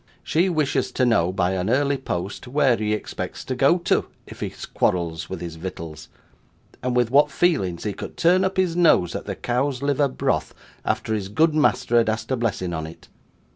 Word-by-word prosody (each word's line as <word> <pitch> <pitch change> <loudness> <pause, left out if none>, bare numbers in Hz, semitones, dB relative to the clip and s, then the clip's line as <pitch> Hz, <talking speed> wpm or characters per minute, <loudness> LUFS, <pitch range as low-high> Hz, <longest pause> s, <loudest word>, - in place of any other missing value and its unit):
She 175 +4 +2
wishes 155 -5 0
to 130 - +2
know, 90 -8 +3
by 95 -1 0
an 95 +1 -1
early 140 +2 +2
post, 95 0 -4
where 135 -1 +3
he 105 -1 -2
expects 105 - -4
to 130 - -2
go 135 +7 +4
to, 175 - 0 0.2
if - - -12
he - - -3 0.2
quarrels 80 -3 0
with 95 -3 -5
his 85 -2 -6
vittles; 80 -3 -7 0.7
and 125 -1 -1
with 120 -1 +2
what 145 +2 +5
feelings 95 - 0
he 105 - -2
could - - -8
turn 180 +3 +4
up 190 0 -1
his 185 -3 +1
nose 160 - +4
at - - -5
the - - -4
cow's 130 +2 -1
liver 145 0 +2
broth, 130 - -1 0.3
after 110 - -1
his 100 -3 -2
good 155 +10 +3
master 150 -5 +2
had 115 - +2
asked 110 +4 -3
a - - +3
blessing 105 -7 -2
on 80 -1 -3
it. 80 - -13
120 Hz, 200 wpm, -23 LUFS, 90-145 Hz, 0.7 s, what